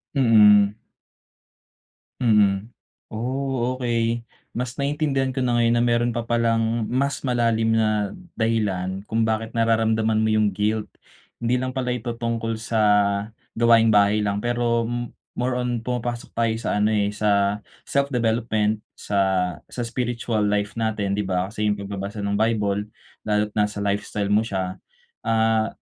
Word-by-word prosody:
Mm. 105 Hz, -5 st, +6 dB, 1.5 s
Mm. 105 Hz, -3 st, +3 dB, 0.4 s
Oh, 130 Hz, +2 st, -2 dB
okay. 120 Hz, -2 st, 0 dB, 0.3 s
Mas 125 Hz, +1 st, -4 dB
naiintindihan 140 Hz, -2 st, 0 dB
ko 130 Hz, -, -2 dB
na 120 Hz, -1 st, +1 dB
ngayon 115 Hz, 0 st, +3 dB
na 120 Hz, -, +2 dB
meron 120 Hz, 0 st, +1 dB
pa 120 Hz, -, -1 dB
palang 115 Hz, -1 st, +1 dB
mas 135 Hz, +5 st, -1 dB
malalim 115 Hz, -3 st, +1 dB
na 110 Hz, -2 st, +1 dB, 0.2 s
dahilan 100 Hz, -5 st, -1 dB
kung 115 Hz, 0 st, +1 dB
bakit 110 Hz, 0 st, -2 dB
nararamdaman 110 Hz, -1 st, +2 dB
mo 110 Hz, -, +2 dB
yung 110 Hz, -2 st, +2 dB
guilt. 105 Hz, +2 st, -1 dB, 0.5 s
Hindi 120 Hz, +2 st, +1 dB
lang 130 Hz, 0 st, -3 dB
pala 130 Hz, -1 st, -2 dB
ito 120 Hz, -1 st, -2 dB
tungkol 115 Hz, -1 st, -2 dB
sa 110 Hz, 0 st, 0 dB, 0.8 s
gawaing 115 Hz, -1 st, +5 dB
bahay 105 Hz, +1 st, +4 dB
lang, 100 Hz, -1 st, -1 dB
pero 120 Hz, 0 st, 0 dB
m 120 Hz, 0 st, -3 dB, 0.2 s
more 125 Hz, +1 st, -1 dB
on 125 Hz, -2 st, -2 dB
pumapasok 120 Hz, 0 st, -3 dB
tayo 115 Hz, -1 st, +2 dB
sa -, -, -1 dB
ano, 105 Hz, +1 st, +2 dB
eh, 100 Hz, -1 st, +1 dB
sa 105 Hz, -1 st, +1 dB, 0.3 s
self-development, 115 Hz, -5 st, 0 dB
sa 95 Hz, -3 st, 0 dB
sa 125 Hz, -, -6 dB
spiritual 115 Hz, -2 st, -1 dB
life 105 Hz, +1 st, -1 dB
natin, 105 Hz, -3 st, -1 dB
'di 105 Hz, -, -1 dB
ba? 95 Hz, 0 st, -1 dB
Kasi 105 Hz, 0 st, -3 dB
yung 105 Hz, 0 st, +1 dB
pagbabasa 100 Hz, +1 st, -5 dB
ng 100 Hz, 0 st, -1 dB
Bible, 105 Hz, -2 st, 0 dB, 0.4 s
lalo't 105 Hz, 0 st, +1 dB
nasa 105 Hz, -1 st, 0 dB
lifestyle 100 Hz, 0 st, -2 dB
mo 105 Hz, +2 st, +3 dB
siya, 95 Hz, -3 st, -3 dB, 0.5 s
ah, 110 Hz, -1 st, +2 dB
110 Hz, 140 wpm, -23 LUFS, 105-120 Hz, 1.5 s, Mm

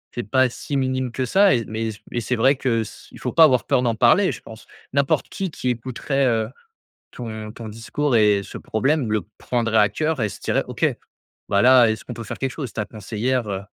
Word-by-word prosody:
c'est 120 Hz, -, -2 dB
pas 130 Hz, +3 st, +4 dB
si 140 Hz, +3 st, -4 dB
minime 130 Hz, -1 st, -1 dB
que 130 Hz, +2 st, -2 dB
ça 195 Hz, -, +4 dB
et 115 Hz, -3 st, 0 dB
mais 110 Hz, +1 st, -3 dB, 0.2 s
mais 120 Hz, -, -2 dB
c'est 125 Hz, +3 st, -1 dB
vrai 130 Hz, +5 st, +4 dB
que 120 Hz, -4 st, 0 dB
c 105 Hz, -, -12 dB
il -, -, -13 dB
faut -, -, -3 dB
pas 165 Hz, -, +7 dB
avoir 130 Hz, -6 st, +4 dB
peur -, -, +2 dB
d'en 120 Hz, -2 st, 0 dB
parler 125 Hz, -, +4 dB
je -, -, -8 dB
pense. 110 Hz, -1 st, -13 dB, 0.3 s
N'importe 140 Hz, 0 st, +1 dB
qui 190 Hz, -2 st, -3 dB
qui 130 Hz, -, -3 dB
écouterait, 130 Hz, +3 st, -1 dB
heu, 110 Hz, -2 st, +1 dB, 0.6 s
ton 110 Hz, -3 st, -7 dB
ton 115 Hz, -1 st, -8 dB
discours 115 Hz, +5 st, -1 dB
et 105 Hz, -2 st, +4 dB
ce -, -, -9 dB
problème 130 Hz, +2 st, 0 dB
le 105 Hz, -, +1 dB, 0.2 s
prendrait 115 Hz, -3 st, 0 dB
à 105 Hz, -, +5 dB
cœur 155 Hz, +7 st, -1 dB
et 110 Hz, -, +1 dB
se -, -, -10 dB
dirait: -, -, 0 dB
«OK, -, -, -2 dB, 0.7 s
bah 100 Hz, -1 st, +3 dB
là 125 Hz, -1 st, +7 dB
est-ce 110 Hz, -1 st, -3 dB
qu'on 125 Hz, -, -6 dB
peut 115 Hz, 0 st, -7 dB
faire 105 Hz, -, -6 dB
quelque 135 Hz, -1 st, -2 dB
chose?» 135 Hz, -4 st, -6 dB
ta 105 Hz, -, -2 dB
conseillère, 115 Hz, +3 st, -2 dB
heu, 95 Hz, -1 st, -3 dB
120 Hz, 225 wpm, -22 LUFS, 110-130 Hz, 0.7 s, pas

